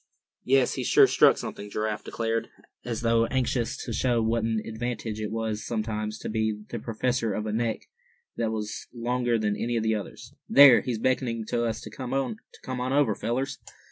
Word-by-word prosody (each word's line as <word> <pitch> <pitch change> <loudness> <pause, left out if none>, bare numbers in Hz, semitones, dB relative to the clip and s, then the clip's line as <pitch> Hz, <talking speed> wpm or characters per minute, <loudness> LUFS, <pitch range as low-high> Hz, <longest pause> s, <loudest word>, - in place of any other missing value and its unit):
"Yes, 135 0 +3
he's - - -3
sure - - +7
struck - - +5
something," 105 - -6
Giraffe 105 +1 -2
declared, 115 0 -2 0.3
as 115 -2 -3
though 115 0 +3
anxious 125 -2 -1
to 115 - -4
show 120 0 +1
what 115 0 +1
an 110 -1 0
advantage 110 -1 -4
it 105 - -2
was 110 -1 -3
sometimes 110 -1 -3
to - - -7
be 110 -1 -1
the 120 - -4
possessor 115 -1 -1
of 105 - -3
a 105 - -2
neck 115 0 -1 0.5
that 115 -1 -1
was 105 -1 -4
longer 120 0 0
than 105 -2 0
any 120 +2 -1
of 110 - 0
the 110 0 +2
others. 105 -3 -6 0.2
"There, 140 -3 +9
he's 125 -3 -2
beckoning 115 -1 0
to 120 0 0
us 115 -1 -2
to 110 - -9
come 130 +3 -4
on 130 0 -3
over, 140 -6 +3
fellers!" 130 +6 -2
115 Hz, 185 wpm, -27 LUFS, 110-125 Hz, 0.5 s, There